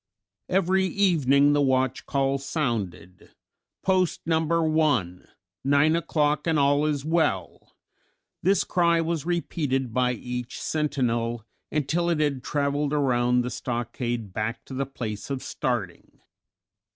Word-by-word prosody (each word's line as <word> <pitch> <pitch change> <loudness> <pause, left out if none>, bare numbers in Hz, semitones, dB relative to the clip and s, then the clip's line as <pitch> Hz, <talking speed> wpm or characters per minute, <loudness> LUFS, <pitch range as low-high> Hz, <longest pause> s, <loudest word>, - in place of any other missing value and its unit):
Every 190 +1 +2
evening 145 -8 +3
the 145 - +3
watch 130 -2 +1
call 135 0 +1
sounded, 115 - -4 0.5
"Post 185 -2 +1
number 160 0 +1
one, 145 - +1 0.4
nine 145 +4 +4
o'clock 150 -2 0
and 160 -2 +2
all 145 +1 +3
is 145 -2 -2
well." 155 - -1 0.7
This 195 +2 +3
cry 170 -1 +2
was 165 -1 -2
repeated 140 -8 -1
by 125 0 +2
each 125 +1 -5
sentinel 120 -7 -1 0.3
until 155 +4 0
it 165 -3 +1
had 145 -4 0
traveled 145 +1 -1
around 125 -4 +2
the 125 +1 -3
stockade 120 -4 -3
back 110 +3 -3
to - - -9
the 135 +1 -2
place 110 -6 -6
of 135 -2 -3
starting. 115 -8 -4
140 Hz, 125 wpm, -25 LUFS, 125-160 Hz, 0.7 s, nine